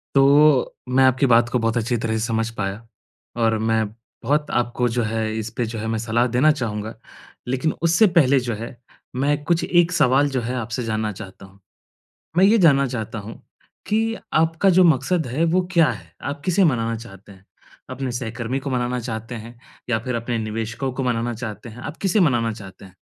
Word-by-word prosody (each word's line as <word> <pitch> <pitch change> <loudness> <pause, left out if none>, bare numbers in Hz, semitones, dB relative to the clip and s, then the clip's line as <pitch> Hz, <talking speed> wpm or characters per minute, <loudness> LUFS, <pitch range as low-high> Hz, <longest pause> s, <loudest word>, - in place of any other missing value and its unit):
तो 140 0 +5 0.2
मैं 130 +1 +4
आपकी 130 +1 +3
बात 120 -1 +4
को 125 - 0
बहुत 115 +1 0
अच्छी 120 +1 0
तरह 110 0 -2
से 110 - -1
समझ 115 -1 -1
पाया 100 +3 -4 0.6
और 110 -1 +2
मैं 110 0 +1 0.4
बहुत 150 +4 0
आपको 120 0 0
जो 120 +1 -1
है, 110 0 -2
इसपे 115 +2 -3
जो 115 0 -5
है, 110 - -4
मैं 110 0 -1
सलाह 115 +2 +1
देना 125 +6 +3
चाहूँगा। 110 -6 -4 0.5
लेकिन 130 +5 0
उससे 170 +6 +4
पहले 135 -1 +4
जो 120 -2 -3
है, 115 +4 -7 0.4
मैं 145 +2 0
कुछ 170 +2 +1
एक 175 0 +3
सवाल 145 -3 +3
जो 130 -2 -2
है, 125 +3 -3
आपसे 120 0 -3
जानना 110 -1 -2
चाहता 95 0 -11
हूँ। 95 +1 -19 0.8
मैं 190 - +6
ये 220 +3 +5
जानना 140 -7 +5
चाहता 115 -3 -5
हूँ 105 +3 -10 0.5
कि 225 +2 0 0.2
आपका 165 +4 +2
जो 185 0 +5
मकसद 160 0 +2
है, 140 +7 -1
वो 175 +3 +2
क्या 165 -4 +4
है? - - -11
आप 145 0 -5
किसे 185 +2 +3
मनाना 115 -7 +1
चाहते 100 -3 -12
हैं? 95 0 -18 0.4
अपने 130 -1 -4
सहकर्मी 120 +2 -3
को 140 - -5
मनाना 125 0 -1
चाहते 115 0 -6
हैं 115 +2 -10 0.3
या 110 -2 +1
फिर 125 +1 -4
अपने 115 0 -2
निवेशकों 115 +4 -3
को 135 - -3
मनाना 120 -1 -1
चाहते 110 -1 -7
हैं? 115 +3 -12
आप 155 - -7
किसे 200 +2 +2
मनाना 120 -9 +2
चाहते 100 -2 -12
हैं? 95 -1 -17
120 Hz, 195 wpm, -22 LUFS, 110-140 Hz, 0.8 s, मैं